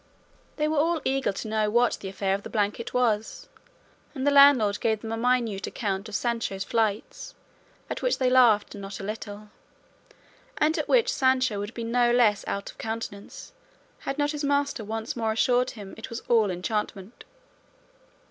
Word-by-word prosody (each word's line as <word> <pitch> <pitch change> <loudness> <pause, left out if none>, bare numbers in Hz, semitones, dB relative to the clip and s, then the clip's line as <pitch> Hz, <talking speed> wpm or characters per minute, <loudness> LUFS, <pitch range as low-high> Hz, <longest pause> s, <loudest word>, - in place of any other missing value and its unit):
They 300 0 0
were 310 -1 +1
all 330 +2 +2
eager 270 -2 +1
to 200 - -6
know 215 -1 0
what 240 +2 +2
the 195 - -6
affair 195 0 -1
of 200 - -2
the - - -9
blanket 210 +1 -1
was, 225 -4 0 0.7
and 265 0 -3
the 285 - +4
landlord 280 -8 +6
gave 220 -2 0
them 225 - -6
a - - -1
minute 230 -4 0
account 200 -2 -3
of 210 - -6
Sancho's 230 -5 -2
flights, 220 -2 -2 0.5
at - - -5
which - - +1
they 260 - +1
laughed 245 -5 +4
not 195 -1 -7
a - - -7
little, 210 0 -7 1.1
and 310 +1 +2
at - - -2
which - - +3
Sancho 260 -5 +2
would 205 +1 -4
have 230 - -18
been 230 -1 -4
no 240 0 +3
less 225 -4 +3
out 200 - -3
of - - -26
countenance 225 - -6 0.5
had 275 - -4
not 290 0 +1
his 295 -1 -5
master 285 -4 0
once 220 +2 -4
more 225 -2 -1
assured 245 +2 +2
him 205 -4 -9
it - - -9
was 230 - -6
all 225 -4 +3
enchantment. 195 +2 -4
225 Hz, 180 wpm, -26 LUFS, 205-255 Hz, 1.1 s, landlord